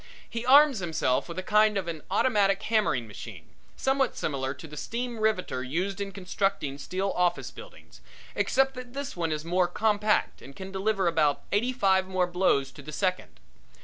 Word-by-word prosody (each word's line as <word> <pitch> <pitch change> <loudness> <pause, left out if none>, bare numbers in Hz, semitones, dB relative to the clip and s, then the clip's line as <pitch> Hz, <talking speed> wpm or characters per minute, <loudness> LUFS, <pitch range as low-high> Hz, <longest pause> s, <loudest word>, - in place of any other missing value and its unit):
He 230 +1 -5
arms 280 -2 +7
himself 160 -6 0
with 170 - -7
a 185 - -3
kind 210 +1 +3
of 190 -3 -2
an 165 -2 -4
automatic 195 -1 +2
hammering 210 - +1
machine, 105 - -10 0.3
somewhat 270 0 0
similar 135 -2 -2
to 130 - -11
the 150 - -10
steam 235 +6 -4
riveter 210 -11 0
used 180 +10 -2
in 200 0 -3
constructing 190 -6 -2
steel 190 +6 -2
office 175 -1 0
buildings, - - -14 0.3
except 270 0 +2
that 250 -1 -9
this 280 0 -5
one 165 -2 -1
is 155 0 -3
more 180 +1 +2
compact 210 +2 +1
and 135 +2 -12
can 190 +3 -8
deliver 195 0 0
about 155 -4 +2
eighty 230 +5 +1
five 190 -6 +2
more 185 -1 +1
blows 175 -7 +1
to 140 - -12
the 150 +2 -9
second. 185 +3 -2
190 Hz, 180 wpm, -27 LUFS, 165-215 Hz, 0.3 s, arms